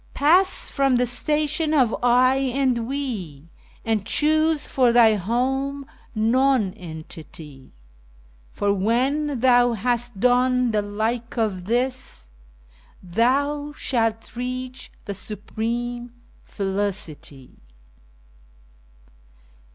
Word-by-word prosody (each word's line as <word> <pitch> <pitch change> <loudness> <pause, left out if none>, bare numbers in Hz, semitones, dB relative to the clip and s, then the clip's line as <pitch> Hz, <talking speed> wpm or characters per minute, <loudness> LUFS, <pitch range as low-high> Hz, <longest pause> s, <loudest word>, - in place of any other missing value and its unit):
Pass 360 +6 +3
from 275 -2 +1
the 250 0 +2
station 300 +5 0
of 250 -6 +3
"I" 250 +2 +4 0.2
and 250 -4 +1
"We," 200 - -5 0.4
and 220 -3 0
choose 310 +6 +2
for 250 -3 +2
thy 235 -2 +6
home 265 +7 -1 0.3
Nonentity, 185 - -2 0.8
For 200 0 0
when 255 +7 0
thou 245 -1 +4
has 240 +2 0
done 250 +2 +2
the 210 -1 +1
like 220 +4 -3
of 200 -6 -1
this, 245 - -2 0.7
thou 280 +10 0
shalt 225 -5 -2
reach 255 +1 -5
the 200 - -4
supreme 235 +4 -4 0.3
Felicity. 190 -9 -5
240 Hz, 90 wpm, -23 LUFS, 210-265 Hz, 0.8 s, thy